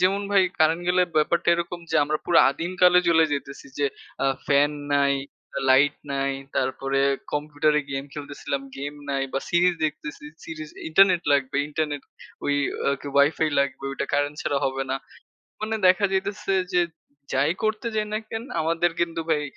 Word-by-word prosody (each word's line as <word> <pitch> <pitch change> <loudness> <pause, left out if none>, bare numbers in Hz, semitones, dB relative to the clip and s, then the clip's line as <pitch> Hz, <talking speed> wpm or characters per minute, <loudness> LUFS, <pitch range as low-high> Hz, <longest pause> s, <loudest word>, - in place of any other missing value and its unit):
যেমন 195 +2 +2
ভাই 200 -1 +5 0.2
কারেন্ট 160 +2 +3
গেলে 180 0 +4
ব্যাপারটা 155 +3 +2
এরকম, 170 +1 -3
যে - - +2
আমরা 155 +1 -1
পুরো 175 - +4
আদিমকালে 180 +3 +3
চলে 165 -1 +5
যেতেছি, 140 -1 -5
যে 145 - +2 0.4
আ - - +3 0.2
ফ্যান 145 +1 +4 0.2
নাই, 140 0 +3 0.6
লাইট 140 +3 +5 0.2
নাই, 140 0 0 0.2
তারপরে 135 +1 0 0.3
কম্পিউটারে 150 0 +1
গেম 135 0 -3
খেলতেসিলাম, 140 -1 -4
গেম 140 +1 -4 0.2
নাই 135 -1 0
বা - - 0
সিরিজ 175 +1 +4
দেখতেছি, 150 -1 -7 0.2
সিরিজ 155 -1 -7 0.2
ইন্টারনেট 180 +1 +5
লাগবে। 140 -1 +1
ইন্টারনেট 150 -2 -2 0.4
ওই 145 - +1 0.5
কি, - - -10
ওয়াইফাই 145 +3 +3
লাগবে, 140 -1 -2
ওইটা 135 - -3
কারেন্ট 145 +1 0
ছাড়া 140 - 0
হবে 135 0 -1
না। 135 - +1 0.6
মানে 215 +1 -2
দেখা 185 +3 +4
যাইতেছে, 195 +1 -1 0.2
যে 180 - +5 0.5
যাই 140 +4 +3
করতে 215 +1 -1
যাই 215 -1 0
না 215 - +1
কেন, 225 +1 -4 0.2
আমাদের 165 +2 +1
কিন্তু 165 -1 -1
ভাই 150 -2 +2
155 Hz, 160 wpm, -24 LUFS, 140-175 Hz, 0.6 s, ভাই